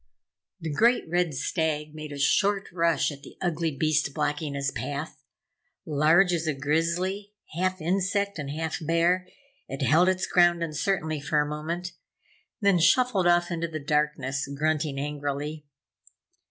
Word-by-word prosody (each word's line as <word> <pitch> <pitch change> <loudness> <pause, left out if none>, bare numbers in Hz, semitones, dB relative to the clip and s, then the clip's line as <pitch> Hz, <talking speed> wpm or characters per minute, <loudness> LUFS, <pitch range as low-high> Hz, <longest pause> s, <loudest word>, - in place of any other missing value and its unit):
The 160 -1 -4
great 235 +7 +3
red 175 -2 0
stag 150 +1 -1
made 155 -1 -8
a 145 - -6
short 195 +7 +2
rush 165 -4 +1
at 140 -1 -10
the - - -14
ugly 170 -2 -1
beast 150 -1 0
blocking 150 -1 -2
his 140 0 -1
path. 145 +2 -5 0.6
Large 160 +5 +4
as 165 -1 -1
a 155 - 0
Grizzly, 170 +8 -1 0.2
half 185 +3 -1
insect 195 +2 0
and 140 -2 -4
half 160 +2 -3
bear, 170 +3 +2 0.4
it 135 0 -2
held 170 +6 +5
its 185 0 0
ground 175 -1 +3
uncertainly 155 -1 -1
for 150 +1 +1
a 150 - +2
moment, 165 +4 -4 0.7
then 200 -3 +4
shuffled 200 0 +3
off 175 0 +3
into 170 0 -2
the 155 -1 -5
darkness, 145 -2 -1
grunting 150 0 -1
angrily. 145 +1 -4
160 Hz, 145 wpm, -26 LUFS, 150-175 Hz, 0.7 s, held